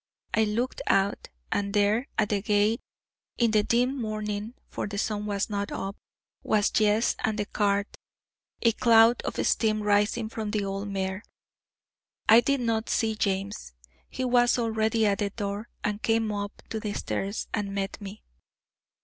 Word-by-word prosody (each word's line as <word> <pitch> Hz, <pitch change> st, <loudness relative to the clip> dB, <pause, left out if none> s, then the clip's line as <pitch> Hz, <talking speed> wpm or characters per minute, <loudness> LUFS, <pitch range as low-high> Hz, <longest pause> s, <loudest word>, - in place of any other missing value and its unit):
I 220 Hz, -, +3 dB
looked 235 Hz, +5 st, -2 dB
out, 195 Hz, +1 st, +1 dB, 0.2 s
and 200 Hz, 0 st, -1 dB
there, 210 Hz, +5 st, +2 dB
at 215 Hz, -1 st, +2 dB
the 205 Hz, -2 st, 0 dB
gate, 210 Hz, +2 st, +2 dB, 0.6 s
in 235 Hz, -2 st, +3 dB
the 215 Hz, -1 st, +4 dB
dim 250 Hz, +4 st, +1 dB
morning 215 Hz, +1 st, -3 dB
for -, -, -4 dB
the 200 Hz, 0 st, -5 dB
sun 210 Hz, 0 st, -1 dB
was 200 Hz, -1 st, -1 dB
not 205 Hz, -1 st, -3 dB
up 195 Hz, +1 st, -4 dB, 0.5 s
was 210 Hz, -1 st, +2 dB
Jess 215 Hz, +1 st, +3 dB
and 220 Hz, -1 st, -1 dB
the 210 Hz, -, -1 dB
cart 200 Hz, 0 st, +1 dB, 0.8 s
a 230 Hz, -, +5 dB
cloud 230 Hz, +1 st, +5 dB
of -, -, -4 dB
steam 215 Hz, -2 st, +2 dB
rising 210 Hz, +2 st, +2 dB
from 220 Hz, -1 st, -4 dB
the 205 Hz, -1 st, -1 dB
old 195 Hz, +1 st, -3 dB
mare. 190 Hz, 0 st, -3 dB, 1.1 s
I 225 Hz, +2 st, +9 dB
did 280 Hz, +1 st, +1 dB
not 225 Hz, -2 st, 0 dB
see 225 Hz, -2 st, +1 dB
James; 200 Hz, -, -2 dB, 0.4 s
he 260 Hz, -, -3 dB
was 245 Hz, 0 st, +4 dB
already 225 Hz, -1 st, +1 dB
at 200 Hz, -1 st, +2 dB
the 205 Hz, -1 st, 0 dB
door, 205 Hz, +1 st, -4 dB
and 210 Hz, 0 st, -2 dB
came 225 Hz, -1 st, +1 dB
up 205 Hz, 0 st, -5 dB
to 220 Hz, -, -2 dB
the 210 Hz, -1 st, -3 dB
stairs, 200 Hz, +1 st, -3 dB
and 200 Hz, -1 st, -2 dB
met 195 Hz, +1 st, -3 dB
me. 200 Hz, +1 st, -9 dB
210 Hz, 165 wpm, -27 LUFS, 205-225 Hz, 1.1 s, I